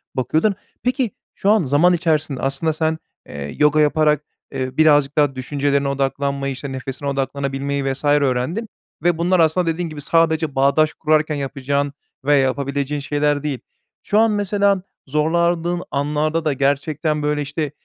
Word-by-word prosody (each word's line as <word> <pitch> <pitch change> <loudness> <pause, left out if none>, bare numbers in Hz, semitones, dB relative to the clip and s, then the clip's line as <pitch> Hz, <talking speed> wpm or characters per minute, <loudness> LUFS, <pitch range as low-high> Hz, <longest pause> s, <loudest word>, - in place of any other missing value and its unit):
bakıyordun. 160 - +1 0.3
Peki, 250 -2 0 0.2
şu 200 - 0
an 215 +1 +5
zaman 150 +6 +4
içerisinde 155 -5 0
aslında 135 +4 0
sen, 160 0 0 0.3
eee, 70 0 -7
yoga 150 +1 +4
yaparak, 150 0 +2 0.3
eee, 130 0 -4
birazcık 145 -2 +4
daha 145 -3 +3
düşüncelerine 140 +1 0
odaklanmayı, 140 0 -1
işte, 140 +1 -6
nefesine 135 +2 -5
odaklanabilmeyi, 140 0 -2
vs. 135 - -10
öğrendin 145 - +1 0.3
ve 175 -1 +2
bunlar 180 +2 +2
aslında 165 +2 +3
dediğin 165 +1 -1
gibi 150 -2 -7
sadece 160 -1 +1
bağdaş 140 +3 +3
kurarken 155 -1 +1
yapacağın 140 0 -2 0.3
veya 145 0 +4
yapabileceğin 140 +2 -1
şeyler 145 0 0
değil. 145 -4 -2 0.4
Şu 210 - +2
an 225 0 +4
mesela 200 -1 +1 0.3
zorlandığın 170 +4 +1
anlarda 150 +3 0
da 150 - +2
gerçekten, 145 +3 0
böyle, 150 0 0
işte, 145 +1 -3
150 Hz, 145 wpm, -20 LUFS, 140-160 Hz, 0.4 s, an